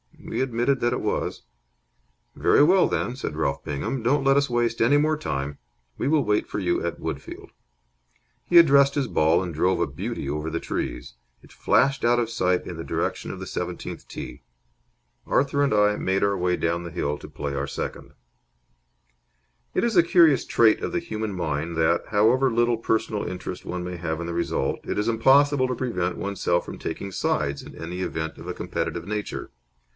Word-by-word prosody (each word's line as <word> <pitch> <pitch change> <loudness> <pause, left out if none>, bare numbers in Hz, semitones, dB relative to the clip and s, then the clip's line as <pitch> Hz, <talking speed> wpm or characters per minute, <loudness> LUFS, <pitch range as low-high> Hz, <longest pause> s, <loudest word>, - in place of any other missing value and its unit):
We - - -3
admitted 130 +1 +1
that 120 0 +1
it - - -2
was. - - -2 0.9
"Very - - +4
well, 180 +4 +5
then," 125 - -2
said 125 - -5
Ralph 70 -3 -1
Bingham. 75 - -3
"Don't 135 +5 +2
let 135 0 +4
us 140 -1 +2
waste 120 -1 0
any 130 +6 +5
more 155 +1 +2
time. 70 - -3 0.4
We - - -1
will 150 -1 +3
wait 105 -2 +1
for - - -5
you 90 -4 0
at 85 - -3
Woodfield." 80 -4 -6 1.0
He 175 - +4
addressed 140 -4 +6
his 140 -3 0
ball, 80 +1 +2
and 90 -2 -5
drove 90 +5 +1
a - - +2
beauty 70 - -5
over 75 +2 -2
the 85 +1 -2
trees. - - -4 0.3
It - - -18
flashed 135 -1 +2
out 120 +1 +4
of 115 -2 -1
sight 90 -6 0
in 85 - -6
the 80 - -5
direction - - -2
of - - -6
the - - -6
seventeenth - - -5
tee. - - -8 0.9
Arthur 140 +1 +1
and 140 - +2
I 105 0 +3
made 95 +1 0
our 100 -1 +2
way 90 0 +1
down 85 0 -1
the 85 - -7
hill 75 -3 -2
to - - -10
play 70 -1 -5
our 70 +1 -2
second. - - -6 1.6
It - - +2
is 235 -2 +1
a 175 - +7
curious 165 -5 +5
trait 110 -2 +4
of - - -3
the 175 - +1
human 110 -10 -4
mind 80 -2 -2
that, 80 +1 +2
however 115 +6 +3
little 120 0 +2
personal 110 -2 -1
interest 90 0 -6
one 90 0 -4
may 90 0 -5
have 80 -2 -3
in 85 - -4
the 85 - -3
result, - - -1
it - - -3
is 105 +2 0
impossible 135 +4 +4
to 125 - -2
prevent 90 -8 -2
oneself 90 -3 -1
taking 100 +4 -5
sides 70 -5 -1
in - - -12
any 90 +3 -6
event 80 -3 -3
of - - -10
a - - -3
competitive 85 - -4
nature. 105 0 -4
105 Hz, 190 wpm, -25 LUFS, 85-130 Hz, 1.6 s, a